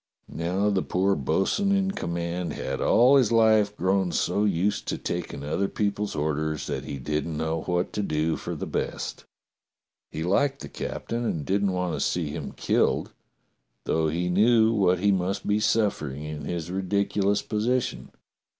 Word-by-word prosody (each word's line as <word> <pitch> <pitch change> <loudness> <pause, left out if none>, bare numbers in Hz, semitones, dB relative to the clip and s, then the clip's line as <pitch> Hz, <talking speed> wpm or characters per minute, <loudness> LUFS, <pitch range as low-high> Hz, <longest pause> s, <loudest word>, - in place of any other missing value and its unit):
" - - -45
Now 95 +5 0
the 95 -2 +1
poor 95 +2 +1
bo'sun 95 - +1
in 195 -1 +2
command 85 - -3
had 65 0 -4
all 125 +4 +5
his 125 -5 +3
life 110 -2 +4
grown 95 0 +1
so 90 +5 +1
used 100 +1 0
to - - -1
taking 70 - -4
other 80 +7 0
people's 105 -1 -2
orders 75 0 -1
that - - -4
he 70 - -5
didn't 75 +4 -2
know 80 +1 -1
what 90 0 -1
to 105 - -1
do 80 -3 0
for - - -5
the - - -4
best. - - -4 0.8
He 80 - -4
liked 135 +10 +1
the - - -7
cap - - -6
tain 120 +1 -1
and 80 -10 -2
didn't 100 0 +1
want 90 -1 -1
to - - -3
see 80 -4 -1
him 80 - -6
killed, - - +1 0.7
though 80 0 +1
he 85 +3 -1
knew 110 +4 +4
what 95 -4 +3
he 100 +3 +2
must 95 +1 -1
be 105 +1 +2
suffering 100 -11 0
in 75 -1 -6
his 85 0 -4
ridiculous 100 +1 0
position. 120 +4 -1
95 Hz, 170 wpm, -26 LUFS, 80-105 Hz, 0.8 s, all